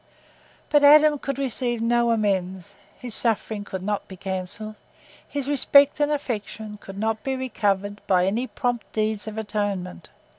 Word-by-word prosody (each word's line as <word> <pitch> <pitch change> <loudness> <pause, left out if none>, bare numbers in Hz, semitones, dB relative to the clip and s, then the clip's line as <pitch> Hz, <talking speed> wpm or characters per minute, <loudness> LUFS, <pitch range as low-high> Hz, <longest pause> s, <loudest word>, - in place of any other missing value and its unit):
But 295 -1 +5
Adam 300 0 +7
could 275 -1 -4
receive 250 -3 -1
no 235 +1 +2
amends; 195 -3 -1 0.2
his 245 -3 -6
suffering 220 -2 0
could 190 -2 -6
not 205 +1 -2
be 190 - -10
cancelled; 195 +3 -5 0.5
his 285 -2 -4
respect 285 0 +4
and 295 0 +2
affection 220 -6 -4
could 195 -1 -10
not 220 +1 -1
be 265 -1 -2
recovered 205 -6 -1
by 180 -1 +3
any 225 +7 -1
prompt 245 -4 -3
deeds 215 -1 -1
of 215 0 -6
atonement. 205 -4 -3
220 Hz, 150 wpm, -24 LUFS, 200-255 Hz, 0.5 s, Adam